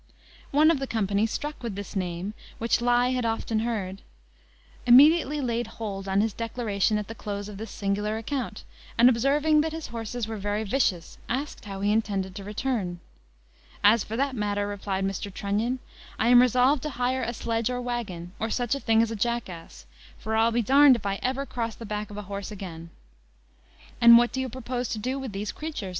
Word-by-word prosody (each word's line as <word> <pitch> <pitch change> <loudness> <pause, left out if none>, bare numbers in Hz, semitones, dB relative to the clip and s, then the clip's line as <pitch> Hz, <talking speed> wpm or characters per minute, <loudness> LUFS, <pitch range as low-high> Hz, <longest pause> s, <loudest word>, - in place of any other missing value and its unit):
One 305 +3 +5
of 310 - 0
the 270 - -3
company, 210 -1 +1
struck 295 +6 -5
with 230 -5 -4
this 200 +1 -7
name, 180 +1 -3 0.2
which 230 +1 +1
he 240 - -4
had 245 +1 +3
often 225 -1 -1
heard, 205 -4 -3 0.9
immediately 295 +4 +6
laid 240 -2 -1
hold 200 -3 -5
on 195 +1 +2
his 220 -1 0
declaration 220 -2 -1
at 210 -1 -4
the 225 - -6
close 205 -2 -5
of 205 -2 -9
this 220 0 -6
singular 205 +2 -2
account, 230 -1 -4 0.3
and, 235 +1 +7
observing 290 +5 +3
that 315 +1 -2
his 320 -1 -6
horses 230 0 -4
were 220 -1 -5
very 205 +2 -1
vicious, 200 -7 -1
asked 275 0 -3
how 195 -1 -6
he 205 +1 +2
intended 200 -4 0
to 200 +1 -7
return. 210 -4 -2 0.8
"As 210 +2 +6
for 220 - -6
that 275 +1 0
matter," 205 -2 -1
replied 195 -1 -2
Mr. 195 +1 -3
Trunnion, 210 +6 -1 0.4
"I 230 - +2
am 245 0 +8
resolved 255 +3 +3
to 305 - -3
hire 255 0 -1
a 235 - -1
sledge 230 0 -1
or 250 0 -2
waggon, 220 -9 -4
or 225 - -1
such 245 +1 0
a 280 - -1
thing 225 -3 +3
as 230 - -2
a - - -3
jackass; 215 -6 -4 0.3
for 220 0 -3
I'll 225 +1 +4
be 235 0 +1
d 260 - -1 0.2
d - - +4
if 230 - -7
ever 250 +7 -1
I - - -8
cross 230 -4 -4
the 230 - -9
back 210 0 -4
of 205 - -9
a 210 - -5
horse 200 0 -6
again." 175 -5 -8 1.1
"And 235 0 +10
what 240 0 +3
do 260 - -2
you 260 - -3
propose 250 0 -4
to - - -2
do 255 +5 -2
with 265 -4 -5
these 205 +1 -4
creatures?" 300 -11 -5
225 Hz, 205 wpm, -26 LUFS, 205-250 Hz, 1.1 s, And